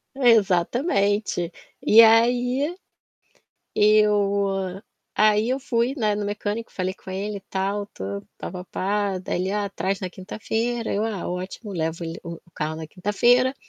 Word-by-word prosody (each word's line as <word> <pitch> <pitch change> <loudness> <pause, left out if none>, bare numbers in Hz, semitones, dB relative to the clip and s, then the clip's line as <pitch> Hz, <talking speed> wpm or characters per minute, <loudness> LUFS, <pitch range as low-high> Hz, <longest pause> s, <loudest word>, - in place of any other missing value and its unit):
Exatamente. 205 - +2 0.3
E 225 +2 +8
aí, 245 +7 +4 1.0
eu 200 -2 +2 0.3
aí, 215 +1 +3
eu 265 +1 0
fui, 245 0 0
né, 215 -4 +1
no 210 - -2
mecânico, 210 +2 -3
falei 185 0 -2
com 190 - -16
ele, 200 +2 -3
tal, 200 +2 -2
tudo, 100 +1 -5
pá - - -6
pá 180 -1 -7
pá. 200 +1 -1
Daí 185 - -3
ele: 190 - -1
"Ah, 205 -1 -1
traz 195 0 -2
na 185 -2 -4
quinta-feira". 225 +5 -3
Eu: 205 +2 0
"Ah, 215 -5 -3
ótimo". 185 +4 -6
Levo 165 0 -2
ele 165 0 -5
o 170 -1 -6
carro 155 +1 -3
na 160 -1 -7
quinta-feira, 240 - +2
205 Hz, 145 wpm, -24 LUFS, 185-225 Hz, 1.0 s, E